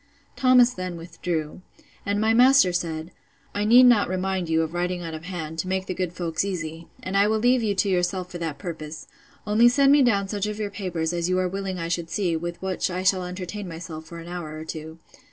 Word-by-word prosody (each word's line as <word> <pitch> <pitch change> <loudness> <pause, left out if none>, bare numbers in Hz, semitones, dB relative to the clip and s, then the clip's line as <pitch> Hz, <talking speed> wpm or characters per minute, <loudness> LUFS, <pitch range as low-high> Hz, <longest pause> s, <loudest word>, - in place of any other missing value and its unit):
Thomas 250 -1 +5
then 185 -3 -5
withdrew. 165 -1 -4 0.5
And 205 +1 +1
my 220 +1 +3
master 250 -5 +6
said, 165 -1 -3 0.4
I 205 0 -1
need 240 +4 +8
not 240 -7 +5
remind 185 -1 -2
you 160 0 +2
of 160 +1 -5
writing 175 0 -2
out 165 -1 -5
of 160 +1 -7
hand, 160 -3 -5
to 185 - -2
make 190 0 -1
the 185 - -3
good 180 -1 -2
folks 170 -2 -2
easy: 165 -4 -5 0.2
and 185 - -4
I 200 +1 +5
will 220 +1 +2
leave 245 +3 +3
you 210 -3 0
to 195 - +1
yourself 180 0 0
for 175 - -6
that 160 -3 -3
purpose; 155 -4 -7 0.4
only 215 +3 +5
send 275 +2 +4
me 290 0 +6
down 200 -6 +2
such 205 0 -2
of 210 0 -4
your 210 -2 -3
papers, 175 -5 -3
as 170 0 -1
you 185 - +2
are 185 0 +1
willing 190 0 -4
I 165 -1 -3
should 170 -1 -2
see, 175 -1 0
with 170 +1 -4
which 190 -1 -1
I 185 0 -3
shall 185 -1 +2
entertain 185 +2 -6
myself 165 -1 -8
for 170 +2 -10
an 165 0 -9
hour 170 -3 -6
or 155 - -7
two. 160 0 -7
180 Hz, 230 wpm, -24 LUFS, 165-200 Hz, 0.5 s, need